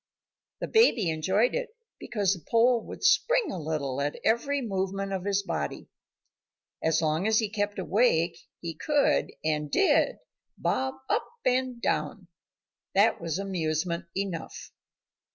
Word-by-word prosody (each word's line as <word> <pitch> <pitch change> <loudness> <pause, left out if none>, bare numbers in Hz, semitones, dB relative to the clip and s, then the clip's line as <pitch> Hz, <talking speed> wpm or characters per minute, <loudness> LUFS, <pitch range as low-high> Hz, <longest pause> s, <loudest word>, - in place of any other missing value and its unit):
The - - -2
baby 245 - +4
enjoyed 190 +9 +1
it - - -2 0.3
because 200 -4 0
the 175 -5 -9
pole 235 0 +4
would - - -9
spring 445 -2 +3
a 185 - -4
little 140 -3 -2
at 145 +1 -2
every 275 +6 +2
movement 195 -3 -2
of 190 -1 -3
his 200 0 +1
body. - - -4 0.9
As 160 +1 +1
long 160 +5 +1
as 220 0 +3
he 220 -2 +1
kept 205 -1 -2
awake, 180 -4 +2 0.2
he 170 -1 -4
could, 295 - +1
and 150 -1 0
did, 390 - +3 0.4
bob 265 0 -1
up - - 0 0.2
and 255 -1 +1
down. 195 -5 -2 0.7
That 200 0 +4
was 165 -1 -2
amusement 170 -2 -2
enough. 195 -4 -4
195 Hz, 135 wpm, -28 LUFS, 165-240 Hz, 0.9 s, baby